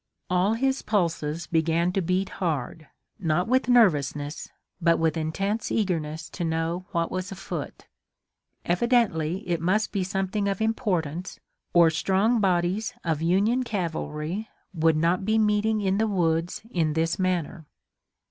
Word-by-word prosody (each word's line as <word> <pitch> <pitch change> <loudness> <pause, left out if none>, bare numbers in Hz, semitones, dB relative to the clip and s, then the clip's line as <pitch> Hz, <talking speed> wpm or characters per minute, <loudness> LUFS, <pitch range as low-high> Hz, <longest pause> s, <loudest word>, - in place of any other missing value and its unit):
All 185 +4 +2
his 265 +3 0
pulses 165 -5 -1
began 165 +2 +1
to 195 - 0
beat 185 +2 0
hard, 155 -2 -2 0.3
not 175 0 0
with 255 +1 +2
nervousness, 150 - +2 0.3
but 170 0 +4
with 160 -2 +1
intense 195 +7 -2
eagerness 160 -7 -1
to 175 - -4
know 165 +3 -2
what 170 -3 -1
was 185 +1 -3
afoot. 195 0 -6 0.8
Evidently 180 -5 +1
it 170 -2 -1
must 200 +6 +1
be 200 -3 -1
something 195 +2 -1
of 195 -1 -1
importance 185 - -1 0.3
or 170 -2 +6
strong 195 +8 +2
bodies 195 +5 0
of 160 -3 -1
Union 200 +9 +2
cavalry 175 -2 -3 0.2
would 160 -2 +2
not 170 +4 +1
be 220 +3 +2
meeting 215 0 +2
in 195 0 +1
the 220 - +2
woods 170 -3 0
in 160 -3 +1
this 165 +3 0
manner. 175 -3 -1
180 Hz, 140 wpm, -26 LUFS, 165-205 Hz, 0.8 s, or